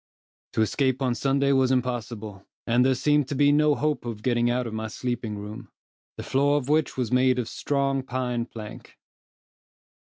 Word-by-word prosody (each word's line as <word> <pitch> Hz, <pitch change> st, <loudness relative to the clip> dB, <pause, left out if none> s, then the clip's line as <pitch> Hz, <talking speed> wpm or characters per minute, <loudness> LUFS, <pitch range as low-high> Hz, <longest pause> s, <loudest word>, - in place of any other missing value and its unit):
To 110 Hz, -, +2 dB
escape 130 Hz, +3 st, 0 dB
on 125 Hz, -2 st, +1 dB
Sunday 140 Hz, +2 st, +1 dB
was 130 Hz, -2 st, +3 dB
impossible, 115 Hz, -5 st, -3 dB, 0.2 s
and 120 Hz, +1 st, +3 dB
there 130 Hz, 0 st, +3 dB
seemed 150 Hz, +1 st, +2 dB
to 140 Hz, -, -3 dB
be 145 Hz, +1 st, +4 dB
no 150 Hz, 0 st, +4 dB
hope 150 Hz, 0 st, -1 dB
of 115 Hz, -3 st, -6 dB
getting 120 Hz, -1 st, +2 dB
out 125 Hz, +1 st, 0 dB
of 115 Hz, -, -5 dB
my 110 Hz, 0 st, -3 dB
sleeping 120 Hz, -2 st, -4 dB
room, 105 Hz, +1 st, -8 dB, 0.5 s
the -, -, -5 dB
floor 140 Hz, +2 st, +2 dB
of 140 Hz, -1 st, -3 dB
which 155 Hz, -2 st, +1 dB
was 125 Hz, -4 st, -1 dB
made 130 Hz, 0 st, +3 dB
of 120 Hz, -3 st, -2 dB
strong 140 Hz, -1 st, -1 dB
pine 125 Hz, -2 st, -3 dB
plank. 110 Hz, -3 st, -10 dB
125 Hz, 175 wpm, -25 LUFS, 120-140 Hz, 0.5 s, be